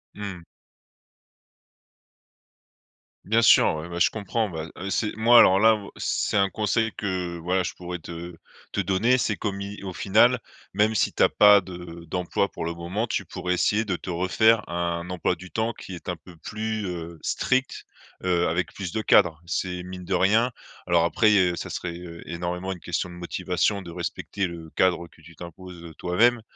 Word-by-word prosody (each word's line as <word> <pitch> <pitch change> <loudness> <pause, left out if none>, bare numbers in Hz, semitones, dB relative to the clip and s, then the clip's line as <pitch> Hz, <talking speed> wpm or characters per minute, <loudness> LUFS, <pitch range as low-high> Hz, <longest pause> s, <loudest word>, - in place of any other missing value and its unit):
Mmh. 100 -4 -6 2.8
Bien 110 +3 +3
sûr. 100 - +6
Ouais, 80 +3 -6
bah, 85 0 -5
je - - +5
comprends. 110 +1 -2
Bah, 80 -2 -6
heu, 95 +2 -5
c'est 105 +3 -1
moi, 120 +2 +7
alors, 95 +1 +6
là, 110 +1 +6
moi, 100 -2 -9
c'est - - 0
un 100 0 +3
conseil 110 +2 0
que, 90 -4 -3
voilà, 90 +3 0
je - - -4
pourrais 90 0 -6
te 85 +1 -8 0.4
te - - -2
donner, 115 +7 +2
c'est - - 0
comme 100 -2 -3
y 100 0 -7
au 95 - -4
final, 115 +7 +4 0.3
même 110 +1 +2
si - - +2
tu - - +2
as - - +7
pas 105 -1 +7
de 90 -2 -9
d'emploi 90 +2 -1
pour - - -6
le 85 0 -2
moment, 90 +7 -3
tu - - -2
pourrais 90 - -3
essayer 105 +5 +2
de 95 -5 -2
te - - -9
refaire 105 +6 +3
un 85 0 -2
emploi 90 -1 0
du 90 +1 -12
temps 110 +1 -1
qui 95 - -10
est 85 - -12
un 90 - -1
peu 85 +2 -16
plus, 110 +4 -4
heu, 85 -2 -6
strict, 130 +1 -1 0.4
heu, 90 -1 +2
avec 85 0 -1
plus 95 -2 -6
de 110 - -1
cadre. 80 -6 +4
C'est 90 0 -3
mine 90 0 -8
de 95 - -2
rien 110 +7 +3 0.3
alors, 85 -1 +3
après, 105 +6 +3
heu, 90 -2 +3
ça - - -5
serait, 85 -1 -5
heu, 85 -1 -9
énormément 90 +2 -3
une 90 - -6
question 90 - -3
de 90 - -10
motivation, 90 +3 -1
de 85 -2 -9
respecter 90 +2 -3
le, 85 -2 -9
cadre 85 -2 +2
que 80 - -22
tu 85 +1 -15
t'imposes, 85 0 -10
heu, 80 -2 -10
toi-même, 115 - +2
90 Hz, 190 wpm, -25 LUFS, 85-105 Hz, 2.8 s, moi